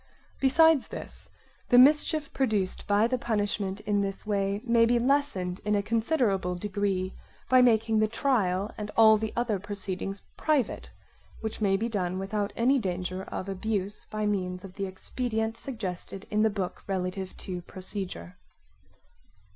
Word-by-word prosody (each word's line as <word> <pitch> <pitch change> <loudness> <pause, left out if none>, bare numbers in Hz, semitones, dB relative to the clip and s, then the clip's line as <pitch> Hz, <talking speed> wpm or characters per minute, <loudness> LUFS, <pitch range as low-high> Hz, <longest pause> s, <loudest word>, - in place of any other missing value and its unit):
Besides 310 +2 +5
this, - - -9 0.4
the 245 - +6
mischief 300 +2 +5
produced 215 -8 -1
by 205 +2 +4
the 250 +2 0
punishment 205 -3 -1
in 205 -1 +1
this 195 +1 -4
way 200 -1 0
may 235 -1 +4
be 240 +1 +4
lessened 235 -9 0
in 210 0 +1
a 200 - +1
considerable 220 - +1
degree 195 -1 -1 0.4
by 255 0 +7
making 225 -2 +3
the 215 - +3
trial 210 -5 0
and 210 0 -4
all 220 -1 +8
the 220 0 -3
other 235 -4 0
proceedings 195 -1 -4
private, 295 -8 0 0.5
which 220 0 -5
may 195 -2 +3
be 225 +4 -1
done 185 -5 -2
without 200 +2 -2
any 260 +4 +3
danger 185 -2 -3
of 190 - -5
abuse 200 +1 -2
by 215 0 -3
means 180 -3 -1
of 190 -2 -10
the 195 0 -3
expedient 220 +3 -3
suggested 195 -6 -5
in 210 0 +2
the 220 - +4
book 195 -3 -4
relative 185 0 -3
to 180 -2 -5
procedure. 185 - -6
205 Hz, 150 wpm, -28 LUFS, 190-230 Hz, 0.5 s, all